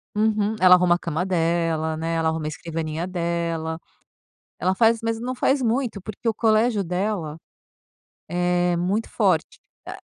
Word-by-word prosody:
Uhum, 215 Hz, 0 st, +1 dB
ela 185 Hz, 0 st, +7 dB
arruma 180 Hz, -1 st, +3 dB
a -, -, -4 dB
cama 170 Hz, 0 st, -2 dB
dela, 165 Hz, -3 st, 0 dB
né, 165 Hz, +1 st, -2 dB
ela 165 Hz, -1 st, +1 dB
arruma 160 Hz, -1 st, -3 dB
a -, -, -1 dB
escrivaninha 160 Hz, 0 st, -4 dB
dela. 170 Hz, -2 st, -2 dB, 0.8 s
Ela 185 Hz, +1 st, +1 dB
faz, 230 Hz, +2 st, +4 dB
mas 225 Hz, 0 st, -2 dB
não 250 Hz, +2 st, -3 dB
faz 265 Hz, +2 st, +1 dB
muito, 235 Hz, -3 st, -1 dB
porque 215 Hz, +4 st, -7 dB
o 225 Hz, -, +3 dB
colégio 220 Hz, -1 st, +2 dB
dela, 180 Hz, -3 st, -2 dB, 0.9 s
é 175 Hz, +1 st, +1 dB
muito 195 Hz, +6 st, -1 dB
forte -, -, 0 dB, 0.3 s
a -, -, -7 dB
180 Hz, 155 wpm, -23 LUFS, 165-215 Hz, 0.9 s, ela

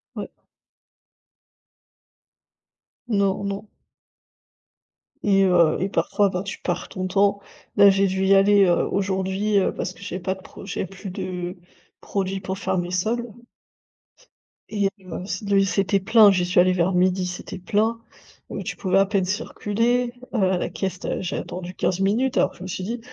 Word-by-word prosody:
Ouais. -, -, -5 dB, 2.8 s
Non, 200 Hz, -2 st, +1 dB
non 200 Hz, +2 st, -5 dB, 1.6 s
et 195 Hz, -1 st, +4 dB
heu 170 Hz, -4 st, +4 dB
et 190 Hz, -, +1 dB
parfois, 200 Hz, 0 st, +1 dB
ben, 180 Hz, 0 st, -3 dB
tu 195 Hz, -, -6 dB
perds 175 Hz, -, -3 dB
ton 185 Hz, 0 st, -4 dB
temps. 200 Hz, +1 st, +2 dB, 0.4 s
Là, 200 Hz, 0 st, +8 dB
j'ai 195 Hz, 0 st, +3 dB
dû 190 Hz, +1 st, -1 dB
y 195 Hz, +1 st, +5 dB
aller, 200 Hz, 0 st, +5 dB
heu, 175 Hz, -1 st, +2 dB
aujourd'hui, 195 Hz, +1 st, 0 dB
heu, -, -, +1 dB
parce 185 Hz, -, -4 dB
que -, -, -18 dB
j'ai 190 Hz, -2 st, -5 dB
pas 190 Hz, +1 st, -2 dB
de 190 Hz, -, -15 dB
pro -, -, -12 dB
j'ai 190 Hz, -, -3 dB
plus 195 Hz, +2 st, -9 dB
de 180 Hz, 0 st, -5 dB, 0.5 s
produits 195 Hz, -1 st, -2 dB
pour 190 Hz, 0 st, -4 dB
faire 190 Hz, 0 st, -1 dB
mes 175 Hz, 0 st, -2 dB
sols 220 Hz, +7 st, 0 dB, 1.4 s
et 205 Hz, -2 st, +1 dB
heu, 185 Hz, -1 st, -7 dB, 0.2 s
de 200 Hz, -1 st, +3 dB
c'était 195 Hz, 0 st, +1 dB
plein. 215 Hz, +1 st, +6 dB
J'y 180 Hz, -2 st, +1 dB
suis 180 Hz, 0 st, +2 dB
allée 185 Hz, +1 st, +5 dB
vers 180 Hz, +1 st, +1 dB
midi, 185 Hz, +1 st, +2 dB
c'était 180 Hz, +1 st, -7 dB
plein, 220 Hz, +5 st, 0 dB, 0.5 s
heu, -, -, -4 dB
tu -, -, -4 dB
pouvais 190 Hz, -1 st, +1 dB
à 195 Hz, -, +5 dB
peine 195 Hz, -2 st, 0 dB
circuler, 230 Hz, +5 st, -1 dB, 0.2 s
heu, -, -, 0 dB, 0.2 s
à 180 Hz, -, +1 dB
la -, -, -2 dB
caisse, 190 Hz, -2 st, -4 dB
tu -, -, -6 dB
as -, -, -2 dB
j'ai 180 Hz, -, -3 dB
attendu 180 Hz, 0 st, -6 dB
15 185 Hz, 0 st, 0 dB
minutes 225 Hz, +7 st, +1 dB
alors -, -, +3 dB
que -, -, -18 dB
je 180 Hz, -, -10 dB
me -, -, -6 dB
suis 185 Hz, 0 st, -4 dB
dit: 230 Hz, +4 st, -3 dB
195 Hz, 175 wpm, -23 LUFS, 185-200 Hz, 2.8 s, Là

